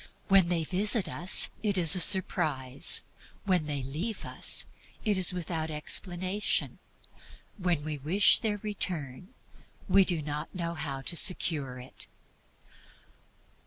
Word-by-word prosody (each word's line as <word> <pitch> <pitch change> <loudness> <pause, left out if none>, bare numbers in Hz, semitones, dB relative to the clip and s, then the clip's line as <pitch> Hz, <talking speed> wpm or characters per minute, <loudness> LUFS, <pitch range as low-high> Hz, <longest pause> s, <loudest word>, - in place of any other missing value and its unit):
When 190 -3 +2
they 170 -2 -3
visit 195 +4 +1
us, 175 +4 +4
it 205 -2 -2
is 175 0 +7
a - - -1
surprise. 155 -8 +4 0.4
When 180 -6 -2
they 145 -3 -6
leave 165 - -7
us, - - +1 0.4
it 210 -2 -1
is 185 -1 +4
without 165 -3 -6
explanation. 185 +6 -3 0.8
When 175 -5 -3
we 155 -2 -7
wish 185 +10 +2
their 215 -3 -3
return, 180 - -6 0.6
we 195 - +2
do 175 -3 -3
not 150 +4 -8
know 170 -2 -6
how 140 -4 -8
to 170 - -6
secure 155 -8 +2
it. 125 +1 -7
175 Hz, 125 wpm, -26 LUFS, 150-190 Hz, 0.8 s, is